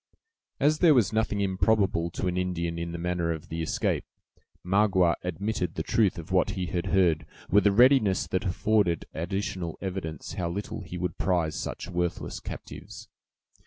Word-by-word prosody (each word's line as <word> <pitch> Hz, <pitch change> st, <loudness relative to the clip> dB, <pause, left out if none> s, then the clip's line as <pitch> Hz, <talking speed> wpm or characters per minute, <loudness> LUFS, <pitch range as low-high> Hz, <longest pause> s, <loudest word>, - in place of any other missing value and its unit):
As 150 Hz, +2 st, +3 dB
there 165 Hz, -5 st, +6 dB
was 110 Hz, -4 st, +3 dB
nothing 110 Hz, -2 st, 0 dB
improbable 95 Hz, -3 st, +2 dB
to 85 Hz, -, -4 dB
an 90 Hz, -1 st, 0 dB
Indian 85 Hz, -2 st, -2 dB
in 85 Hz, 0 st, -4 dB
the 85 Hz, -, -5 dB
manner 85 Hz, -1 st, -1 dB
of 80 Hz, -2 st, -6 dB
the 80 Hz, 0 st, -3 dB
escape, 80 Hz, -, 0 dB, 0.6 s
Magua 95 Hz, -2 st, +3 dB
admitted 90 Hz, -1 st, -2 dB
the 80 Hz, -, -2 dB
truth 105 Hz, -1 st, +2 dB
of 85 Hz, +2 st, -8 dB
what 95 Hz, -1 st, +3 dB
he 90 Hz, -, -1 dB
had 90 Hz, +2 st, -2 dB
heard, 85 Hz, -6 st, +2 dB, 0.2 s
with 105 Hz, +2 st, +5 dB
a -, -, +5 dB
readiness 120 Hz, -3 st, +5 dB
that 95 Hz, -, -1 dB
afforded 95 Hz, -2 st, +1 dB
additional 90 Hz, 0 st, -3 dB
evidence 90 Hz, -6 st, -5 dB
how 85 Hz, -2 st, -2 dB
little 100 Hz, +4 st, -4 dB
he 90 Hz, -2 st, -7 dB
would 90 Hz, -2 st, -3 dB
prize 85 Hz, -4 st, +1 dB
such -, -, -5 dB
worthless 90 Hz, -2 st, -2 dB
captives. -, -, -9 dB
90 Hz, 165 wpm, -27 LUFS, 85-100 Hz, 0.6 s, there